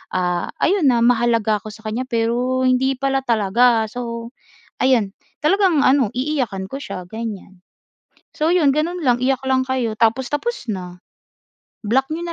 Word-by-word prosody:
ah, 180 -1 0 0.2
ayun 370 -5 +3
na, 240 -3 +3
mahalaga 230 -3 +2
ako 215 - -12
sa 220 +1 -14
kanya, 225 +4 -2
pero 245 +2 0
hindi 260 +1 +2
pala 270 +1 0
talaga. 230 +1 +3
So 235 -1 -6 0.5
ayun, 230 -7 +2 0.3
talagang 350 -1 +3
ano, 260 -5 +3
iiyakan 250 -8 -2
ko 270 - -6
siya 185 -6 -7
ganiyan. 200 -3 -7 0.7
So 315 +2 +1
'yon, 330 -6 +4
gano'n 340 +4 -1
lang, 245 -3 +2
iyak 265 0 0
lang 260 0 +2
kayo 250 -4 -1
tapos, 230 +4 +1
tapos 470 - -3
na, 180 -2 -7 0.9
block 265 +6 +1
niyo 335 +2 -3
245 Hz, 150 wpm, -20 LUFS, 220-270 Hz, 0.9 s, yon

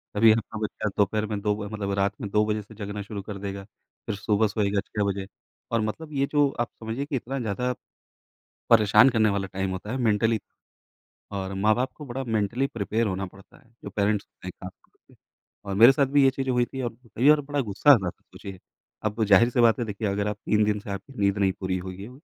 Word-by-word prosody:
कभी 110 +2 +7
आपका 110 0 -1
बच्चा 105 0 -3
दोपहर 105 +1 +1
में 105 -1 -3
2 105 0 +1
मतलब 100 -2 -3
रात 100 +1 +1
में 100 - -4
2 105 +1 +2
बजे 105 0 -1
से 110 +2 -15
जगना 105 -1 -5
शुरू 100 0 -6
कर 100 +1 -7
देगा, 100 0 -5 0.4
फिर 110 - -2
सुबह 105 +1 +1
सोएगा 100 -1 0
6:00 105 - -3
बजे, 95 0 -4 0.4
और 115 -1 +2
मतलब 150 +9 -4
ये 140 -1 +1
जो 145 -2 +4
आप 120 - 0
समझिए 115 +5 -3
कि 145 -1 -4
इतना 135 +2 -3
ज़्यादा 125 +2 -1 1.0
परेशान 115 +3 +6
करने 110 -3 +3
वाला 100 -1 -1
टाइम 95 0 -1
होता 95 +3 -5
है 130 - -2
मेंटली 115 -2 +2 0.9
और 95 -1 -3
माँ-बाप 110 +6 +1
को 150 - -9
बड़ा 130 +1 -4
मेंटली 115 +3 0
प्रिपेयर 110 -2 -1
होना 95 0 -2
पड़ता 95 +1 -17
है। 115 - -24
जो - - -6
पेरेंट्स 105 0 0
होते - - -14
हैं - - -4
ख़ास - - -6 1.0
और 100 - -2
मेरे 115 +6 +9
साथ 140 +1 +2
भी 140 +1 +4
ये 135 - +6
चीज़ें 135 0 -2
हुई 125 -1 +2
थीं। 130 0 -4
कई 115 +3 0
बार 150 -1 +6
बड़ा 145 0 -3
ग़ुस्सा 110 +5 +4
आता 100 -10 +4
था - - -15
मुझे, 95 -1 -9 0.5
अब 110 +1 0
ज़ाहिर-सी 115 +5 +4
बात 115 +1 +4
है 120 - -1
देखिए 105 0 -3
अगर 100 +1 -1
आप 105 - -2
3 105 0 +3
दिन 105 0 0
से 105 +1 -11
आपकी 100 +7 -7
नींद 100 0 +2
नहीं 100 -1 +2
पूरी 95 -1 -1
हुई 95 +1 -7
है। 105 - -8
105 Hz, 220 wpm, -26 LUFS, 100-120 Hz, 1.0 s, मेरे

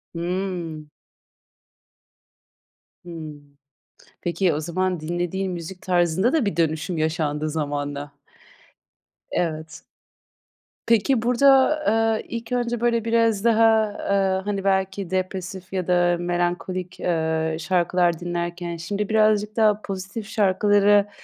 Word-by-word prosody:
Hıı. 175 -3 -3 2.2
Hıı. 160 -3 -7 0.9
Peki, 175 -1 +1
o 150 - -2
zaman 180 +2 -1
dinlediğin 175 +4 -2
müzik 175 +1 -7
tarzında 180 +5 +1
da 310 -9 +2
bir 200 - -1
dönüşüm 160 +1 0
yaşandı 155 -1 -1
zamanla. 145 -1 -3 1.2
Evet. 160 -1 -3 1.0
Peki, 230 +2 +3
burada, 265 +5 +4 0.4
eee, - - -9
ilk 230 0 -6
önce, 240 -1 -1
böyle 235 -2 +1
biraz 230 -3 +2
daha, 225 -1 +4
eee, 195 -2 0
hani, 200 -2 -2
belki 190 -1 0
depresif, 185 0 -4
ya 185 -2 -2
da 175 -1 +3
melankolik, 175 +1 -2
eee, 160 -2 0
şarkılar 175 0 +1
dinlerken, 175 0 -4
şimdi, 200 +5 -3
birazcık 215 -1 +2
daha 215 -2 +3
pozitif 195 +2 -6
şarkılara 205 0 +3
185 Hz, 105 wpm, -23 LUFS, 170-205 Hz, 2.2 s, burada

